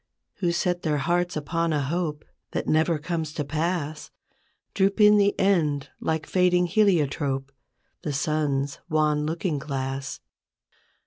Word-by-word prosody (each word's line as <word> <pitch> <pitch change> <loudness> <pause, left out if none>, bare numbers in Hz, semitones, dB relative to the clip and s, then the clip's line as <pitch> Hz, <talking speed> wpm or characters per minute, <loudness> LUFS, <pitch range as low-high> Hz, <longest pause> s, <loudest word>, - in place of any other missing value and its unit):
Who 175 -3 +1
set 175 0 0
their 150 -2 0
heart 175 +5 0
upon 165 +3 -1
a 150 -2 +1
hope 155 0 -2 0.3
That - - -1
never 160 +1 +2
coipes 160 0 -3
to 150 - -2
pass, 155 0 -2 0.6
Droop 195 +2 +1
in 210 0 +7
the 200 0 +2
end 155 -8 +1
like 160 -1 -1
fading 180 -1 +3
heliotrope, 145 -8 +1 0.5
The 150 - -3
sun's 145 -1 -1
wan 150 -1 +1
looking 165 -1 -1
glass. 135 -1 -4
155 Hz, 130 wpm, -25 LUFS, 145-175 Hz, 0.6 s, in